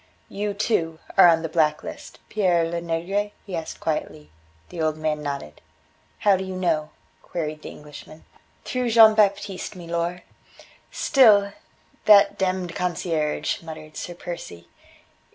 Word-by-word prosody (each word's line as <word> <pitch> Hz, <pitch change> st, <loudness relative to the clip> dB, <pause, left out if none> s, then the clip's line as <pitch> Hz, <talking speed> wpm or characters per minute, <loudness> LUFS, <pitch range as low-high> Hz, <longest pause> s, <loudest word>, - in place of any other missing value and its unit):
"You, 205 Hz, 0 st, -3 dB
too, 165 Hz, -6 st, 0 dB, 0.2 s
are 190 Hz, -, +8 dB
on 165 Hz, -1 st, +4 dB
the -, -, -1 dB
black 155 Hz, -1 st, +1 dB
list, -, -, -9 dB
Pere 180 Hz, -5 st, +2 dB
Lenegre?" 170 Hz, +5 st, -2 dB
he 195 Hz, -4 st, -5 dB
asked 165 Hz, -1 st, -6 dB
quietly. 75 Hz, -, -4 dB, 0.4 s
The 170 Hz, -, -6 dB
old 155 Hz, -1 st, 0 dB
man 155 Hz, -1 st, -2 dB
nodded. 140 Hz, -, -6 dB, 0.6 s
"How 205 Hz, -2 st, +4 dB
do 190 Hz, -, -3 dB
you 190 Hz, 0 st, -6 dB
know?" 165 Hz, -4 st, 0 dB, 0.3 s
queried 155 Hz, -3 st, -5 dB
the -, -, -8 dB
Englishman. 150 Hz, +1 st, -13 dB, 0.4 s
"Through 250 Hz, -1 st, -1 dB
Jean 225 Hz, -1 st, +8 dB
Baptiste, 200 Hz, -2 st, 0 dB
milor." 170 Hz, 0 st, -3 dB, 0.7 s
"Still 205 Hz, -7 st, +4 dB, 0.5 s
that 205 Hz, -2 st, +6 dB
demmed 185 Hz, -2 st, -1 dB
concierge," 165 Hz, -4 st, -2 dB
muttered 155 Hz, -2 st, -10 dB
Sir 175 Hz, -, -6 dB
Percy. 85 Hz, -, -8 dB
170 Hz, 135 wpm, -24 LUFS, 155-195 Hz, 0.7 s, are